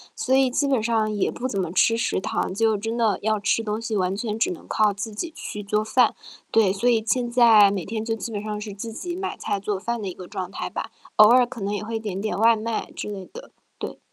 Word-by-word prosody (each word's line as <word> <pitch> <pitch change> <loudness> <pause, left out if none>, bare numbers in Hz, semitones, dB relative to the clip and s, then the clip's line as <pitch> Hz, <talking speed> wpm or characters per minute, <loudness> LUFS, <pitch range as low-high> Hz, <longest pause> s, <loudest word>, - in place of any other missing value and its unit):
所 260 - -1
以 265 -1 +4
基 285 +2 +1
本 265 -5 +2
上 220 -1 +1
也 205 -2 0
不 255 - -3
怎 200 -6 -2
么 175 -3 -2
吃 225 +5 +3
食 230 - 0
堂， 185 - -2
就 220 0 +2
真 225 +3 -3
的 220 -4 +2
要 215 -1 +1
吃 215 +2 +1
东 215 +1 -3
西， 220 -2 -2
完 185 0 0
全 215 0 -3
只 220 - +2
能 170 - -9
靠 210 -2 +2
自 210 +3 -5
己 320 +10 -5
去 210 - -6
做 210 +2 0
饭。 235 +2 +3 0.4
对， 215 -4 +4
所 210 +5 -1
以 225 -2 +2
现 245 +1 +1
在 225 -5 +6
每 190 -4 -2
天 220 +3 -4
就 225 -1 -1
基 225 +1 -6
本 205 - -3
上 210 -1 -4
是 210 -1 -6
自 220 +3 -7
己 350 +7 -5
买 380 +1 -4
菜 205 -2 -2
做 200 0 -2
饭 235 +3 -3
的 200 - -4
一 185 - -4
个 180 0 -10
状 185 -1 -5
态 - - -4
吧， - - -5 0.3
偶 210 0 +9
尔 250 0 +6
可 245 -2 -9
能 200 +1 -2
也 205 - -3
会 225 +1 -3
点 200 -3 -4
点 215 - -2
外 225 +1 +5
卖 220 +1 -3
之 - - -5
类 195 -2 -6
的。 - - -10 0.3
对。 - - -6
215 Hz, 285 characters per minute, -24 LUFS, 205-230 Hz, 0.4 s, 偶